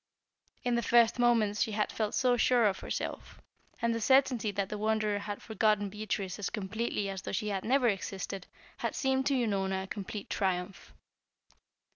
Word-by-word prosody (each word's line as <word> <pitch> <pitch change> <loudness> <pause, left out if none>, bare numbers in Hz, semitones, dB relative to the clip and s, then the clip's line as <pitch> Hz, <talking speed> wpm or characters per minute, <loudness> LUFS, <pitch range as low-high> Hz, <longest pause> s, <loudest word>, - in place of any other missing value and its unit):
In 245 -1 +1
the 235 - +2
first 235 +1 +4
moments 225 -4 +3
she 220 - +1
had 210 0 0
felt 215 -2 -2 0.2
sure 240 0 +4
of 195 -2 +1
herself, - - -5 0.4
and 235 0 +1
the 230 - -2
certainty 260 -3 +3
that 200 -1 -2
the 210 - -4
Wanderer 215 -1 +1
had 205 0 -6
forgotten 215 -2 +1
Beatrice 205 -2 -3
as 205 - -2
completely 215 0 -2
as 195 -1 -4
though - - -5
she 210 +2 -1
had 195 -2 -2
never 255 +1 +3
existed 195 -2 -3 0.3
had - - -3
seemed 265 0 +1
to 280 - +2
Unorna 195 -5 0
a - - -8
complete 200 +1 -6
triumph. 185 0 -2
210 Hz, 170 wpm, -31 LUFS, 195-235 Hz, 0.4 s, first